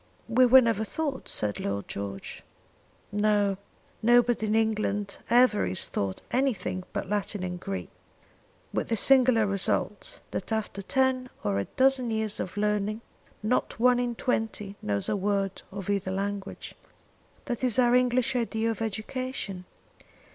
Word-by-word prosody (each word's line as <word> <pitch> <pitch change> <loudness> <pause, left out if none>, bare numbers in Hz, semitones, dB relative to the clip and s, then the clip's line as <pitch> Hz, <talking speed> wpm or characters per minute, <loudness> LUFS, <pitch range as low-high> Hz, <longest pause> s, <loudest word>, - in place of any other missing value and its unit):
"We 250 +3 +5
never 235 -4 +6
were - - +1
taught," 295 -5 -3
said 105 -1 -1
Lord 100 0 -3
George. 100 0 -6 0.7
"No; 205 -1 +2 0.4
nobody 240 -1 +4
in 210 - +1
England 210 -2 0
ever 240 -2 +5
is 90 +1 -1
taught 95 -1 -3
anything 245 -8 0
but - - -3
Latin 205 -1 -2
and 180 -1 -4
Greek, 195 +1 -5 0.8
with - - -1
this 225 -2 +1
singular 255 -4 +5
result, 195 -1 0
that - - -4
after 220 -2 -2
ten 260 +3 +1
or 100 -1 0
a 100 - -1
dozen 260 -2 +2
years 220 -1 -2
of 185 - -5
learning 210 +1 0 0.4
not 235 +1 0
one 250 +1 +5
in 245 -1 -1
twenty 220 -5 -2
knows 100 -1 -1
a - - +1
word 195 -1 -1
of 195 -1 -6
either 200 -2 0
language. 195 +1 -4 0.7
That 240 +1 -3
is 250 -2 +2
our 245 -1 +4
English 250 +1 +3
idea 225 -1 0
of 225 - -6
education. 220 -3 -4
215 Hz, 145 wpm, -28 LUFS, 195-245 Hz, 0.8 s, never